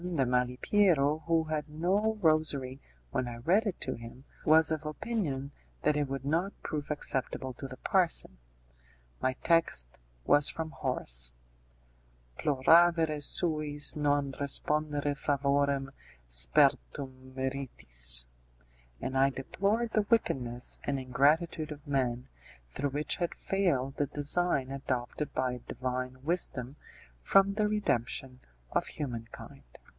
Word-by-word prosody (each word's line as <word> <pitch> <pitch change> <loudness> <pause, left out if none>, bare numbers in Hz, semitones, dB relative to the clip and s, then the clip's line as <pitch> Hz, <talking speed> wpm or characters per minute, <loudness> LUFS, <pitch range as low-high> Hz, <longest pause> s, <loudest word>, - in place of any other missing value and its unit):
de 170 -7 0
Malipiero, 140 +5 +2
who 165 -1 +3
had 155 -1 -3
no 190 +8 0
rosary 145 -4 +1 0.3
when 125 - -1
I 120 - -6
read 180 - +2
it 190 - -3
to 130 - -1
him, 115 +3 -11 0.2
was 160 +1 +5
of 155 -1 -2
opinion 150 - -3 0.3
that 150 0 +3
it 145 -1 0
would 135 0 -5
not 170 +7 0
prove 150 -2 -4
acceptable 130 -3 -2
to 135 +3 -7
the 130 -1 -10
parson. 170 - +1 0.8
My 130 - +1
text 160 - +1 0.3
was 145 - +5
from 160 -1 -4
Horace: - - +1 1.1
'Ploravere 160 +2 +4
suis 150 -2 +2
non 145 -2 +1
respondere 145 +1 -1
favorem 140 -1 0 0.4
sperdtum 60 - +1
meritis'; 60 - 0 0.7
and 130 - -4
I 135 +1 +4
deplored 200 - -1
the 210 -2 +1
wickedness 125 - 0
and 140 -1 -1
ingratitude 150 +5 +1
of 150 0 -9
men, 130 -4 -1 0.4
through 145 - -2
which 145 +2 -1
had 175 -1 -2
failed 140 -9 -1
the 145 - 0
design 145 -1 +1
adopted 135 +1 -3
by 125 -1 -1
Divine 130 0 -4
wisdom 140 -5 -1 0.4
for 195 - +5
the 205 +2 0
redemption 130 - -1 0.3
of - - 0
humankind. 120 -5 -7
140 Hz, 120 wpm, -30 LUFS, 130-160 Hz, 1.1 s, was